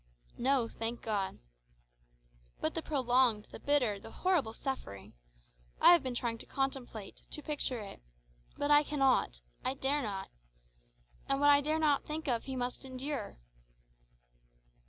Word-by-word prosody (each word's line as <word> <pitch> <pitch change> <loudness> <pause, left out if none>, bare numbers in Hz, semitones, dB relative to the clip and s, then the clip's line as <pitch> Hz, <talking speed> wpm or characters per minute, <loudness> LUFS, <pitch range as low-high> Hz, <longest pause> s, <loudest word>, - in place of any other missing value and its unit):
"No; 260 -2 +2
thank 230 +1 -4
God." 205 -4 -1 1.2
"But 155 - 0
the - - -2
prolonged, 250 -7 +2
the - - -9
bitter, 250 -8 +1
the - - -11
horrible 350 -12 +1
suffering! 225 - -5 0.7
I - - +9
have 345 - +5
been 255 -2 -4
trying 235 -1 -2
to - - -4
contemplate, 260 -7 -3
to 300 - -2
picture 280 -6 -1
it 200 - -9 0.6
but 290 +1 0
I 295 0 +8
cannot, 270 - +1 0.2
I 265 - 0
dare 280 +2 +1
not. 200 -5 -4 1.0
And 275 0 +2
what 290 0 +6
I 285 0 +6
dare 305 +2 0
not 300 -3 +2
think 310 +1 -5
of, 235 -3 0
he 265 - -4
must 250 +1 -3
endure." 265 -2 -4
265 Hz, 145 wpm, -33 LUFS, 230-290 Hz, 1.2 s, I